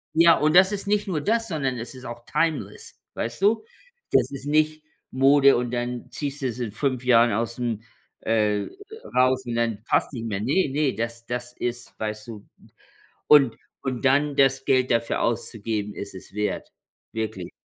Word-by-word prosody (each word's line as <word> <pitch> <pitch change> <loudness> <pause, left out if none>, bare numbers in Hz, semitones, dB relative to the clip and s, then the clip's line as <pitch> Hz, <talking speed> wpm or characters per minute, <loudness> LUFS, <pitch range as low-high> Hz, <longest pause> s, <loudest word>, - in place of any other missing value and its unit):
Ja, 165 0 +7
und 155 +2 +2
das 190 +2 +7
ist 200 0 -4
nicht 205 0 +1
nur 165 -6 -1
das, 225 +7 +1
sondern 135 - -2
es 120 +3 -6
ist 130 - -11
auch 120 0 -8
timeless, 150 -10 -2
weißt 115 +7 -4
du? 210 +3 +3 0.5
Das - - +3
ist 135 -1 -7
nicht 155 +1 +1 0.3
Mode 140 +1 +5
und 120 0 -1
dann 120 0 -4
ziehst 145 0 -4
du 135 - 0
es 120 0 -5
in 120 -4 -3
5 130 +1 -1
Jahren 120 -1 +5
ausm 115 +1 -2 0.4
äh, 105 -2 +1 0.5
raus 130 0 +3
und 120 -1 -3
dann 115 -3 -1
passt - - +1
nicht 115 -5 -6
mehr. 105 -3 -3
Ne, 145 - +2
ne, 140 0 +1
das 115 0 -4
das 125 0 -4
ist, 120 0 -5
weißt 110 0 -4
du 110 -3 -9 0.8
und 140 -6 +6 0.3
und 130 -2 -3
dann 140 +2 +3
das 135 -1 +3
Geld 130 -1 +2
dafür 115 -1 +1
auszugeben, 110 -2 -2
ist 100 -1 -7
es 95 - -12
wert. 105 0 -3 0.4
Wirklich. 110 -5 -4
125 Hz, 175 wpm, -24 LUFS, 115-145 Hz, 0.8 s, Ja